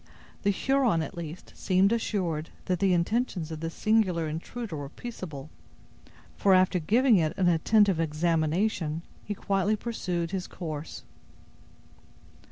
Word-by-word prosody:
The 200 - +2
Huron, 240 -4 +2
at - - -7
least, 170 0 -8
seemed 190 +1 +2
assured 175 -9 -1 0.2
that 180 -2 0
the 195 0 +3
intentions 175 -1 0
of 160 - -5
this 165 +1 -5
singular 195 -7 +2
intruder 170 +6 -5
were 145 -2 -5
peaceable, 155 - -8 0.8
for 195 -2 +4
after 185 0 +3
giving 230 - +4
it 160 -2 0
an 185 - +2
attentive 190 +2 +4
examination, 165 +1 0 0.2
he 205 - -4
quietly 195 +2 +1
pursued 180 -7 -3
his 190 -2 -3
course. 155 -3 -6
180 Hz, 130 wpm, -28 LUFS, 160-205 Hz, 0.8 s, for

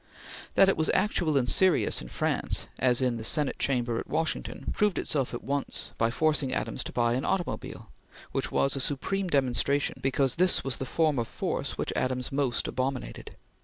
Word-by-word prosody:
That 195 - +6
it 195 - +2
was 160 - +1
actual 175 -6 +2
and 125 -2 +1
serious 185 +5 +3
in 60 - -8
France - - 0
as 125 0 +3
in 125 -2 +1
the 110 - -6
Senate 145 +4 +1
Chamber 120 -4 0
at - - -6
Washington, 160 0 -2
proved 210 -2 +2
itself 135 -4 0
at 120 - -6
once 140 0 -2
by 115 - +3
forcing 145 +1 +1
Adams - - -2
to - - -5
buy 120 -1 +1
an 130 +2 -1
automobile, 185 -2 -3 0.4
which - - -2
was 135 - +1
a - - -2
supreme 185 +9 -1
demonstration 140 -1 +1
because 135 +1 +1
this 180 +1 +4
was 135 -2 -2
the 130 - -4
form 155 -5 +2
of 115 - -2
force - - -3
which - - -2
Adams 130 -1 -1
most 135 -3 0
abominated. 130 0 -4
135 Hz, 185 wpm, -28 LUFS, 125-155 Hz, 0.4 s, That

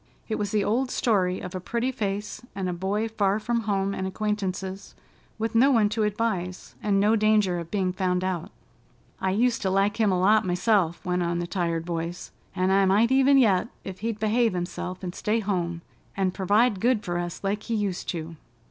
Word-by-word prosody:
It 220 - -2
was 205 -1 -1
the 210 -1 +1
old 250 +6 0
story 190 -8 +1
of 180 - -7
a 185 - -3
pretty 235 +7 -1
face, 205 -3 -3
and 190 -1 -2
a 180 - -1
boy 195 +5 -1
far 205 -3 +1
from 235 +2 -1
home 200 -1 0
and 190 -1 -3
acquaintances, 195 -1 -3 0.4
with 225 0 -2
no 245 +5 +5
one 225 -6 +4
to 220 +1 -1
advise, 205 -4 -2
and 200 -2 +2
no 210 +3 +4
danger 210 -4 +3
of 170 -1 -7
being 185 -2 0
found 180 -1 0
out. 185 -3 -2 0.7
"I 190 - 0
used 235 +5 +1
to 190 - 0
like 195 +2 +1
him 215 -3 +3
a 185 - +1
lot 210 +4 +4
myself," 180 -1 +1
went 180 0 0
on 170 0 0
the 175 - -2
tired 170 -2 -2
voice, 170 0 -4 0.2
"an' 185 +1 +1
I 195 0 +4
might 215 +6 +3
even 270 +1 +5
yet 215 -6 +4 0.2
ef 190 -1 -7
he'd 225 0 -2
behave 220 +1 +2
himself 180 +1 -4
and 180 -1 -4
stay 215 +4 0
home, 175 -5 -2 0.3
an' 190 -1 +1
pervide 205 +3 +2
good 235 0 +2
fer 175 -2 -2
us 175 +2 -5
like 200 +2 -1
he 230 - -3
used 200 -4 -2
to." 165 -1 -5
195 Hz, 200 wpm, -26 LUFS, 180-215 Hz, 0.7 s, no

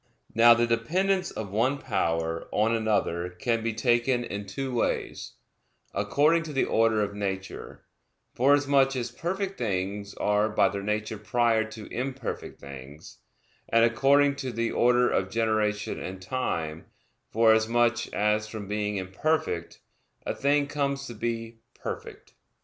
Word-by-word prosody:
Now 115 +1 +7
the 120 0 +2
dependence 180 +12 +1
of 105 -3 -6
one 125 +7 +1
power 85 - -1
on 110 +2 +2
another 105 -6 0
can 115 +6 -1
be 115 +1 -1
taken 120 +2 +1
in 100 -3 -5
two 130 +7 -4
ways; 120 - -2 0.6
according 155 +4 +2
to 160 -2 -7
the 135 - +2
order 110 -1 +2
of 100 0 -3
nature, 95 -2 -5 0.5
forasmuch 140 0 +3
as 120 -2 -3
perfect 190 +8 -3
things 100 -2 -2
are 105 +1 +1
by 110 - +3
their 100 0 -4
nature 105 +1 -2
prior 115 +1 +2
to 110 -1 -9
imperfect 130 0 -4
things; 70 +2 -11 0.5
and 115 0 +5
according 140 +4 +3
to 130 -3 -4
the 115 0 -1
order 125 0 +4
of 95 -4 0
generation 110 -1 0
and 95 +1 -6
time; 85 -8 -3 0.4
forasmuch 115 +1 +3
as 105 +1 +1
from 105 -2 -7
being 105 0 -2
imperfect, 95 - -2 0.4
a - - -1
thing 145 +1 +2
comes 140 -1 -2
to 120 - -7
be 115 0 -4 0.2
perfect. - - -8
115 Hz, 140 wpm, -27 LUFS, 105-130 Hz, 0.6 s, Now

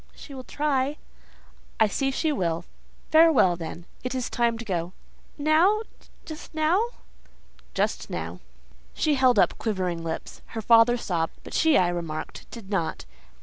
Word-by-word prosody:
"She 285 - -11
will 260 -1 -7
try." 285 -1 0 0.8
"I 220 - +6
see 270 +6 0
she 310 +4 0
will. 170 - -1 0.5
Farewell, 315 - +6
then. 165 0 -7 0.2
It 250 +1 -3
is 255 -2 -3
time 235 -1 +1
to 235 - -7
go." 175 -3 -2 0.4
"Now?—just 320 0 -1
now? 320 +7 +3 0.9
"Just - - -1
now." - - -5 0.6
She 310 - +2
held 260 -4 +4
up - - +3
quivering 185 -6 -2
lips. 160 -1 -5 0.2
Her - - -1
father 230 +2 +6
sobbed, 170 -7 -2
but - - -10
she, 320 -2 +4
I 180 -1 +3
remarked, 165 -3 -5
did 215 -4 -10
not. 170 -5 -2
235 Hz, 145 wpm, -26 LUFS, -, 0.9 s, I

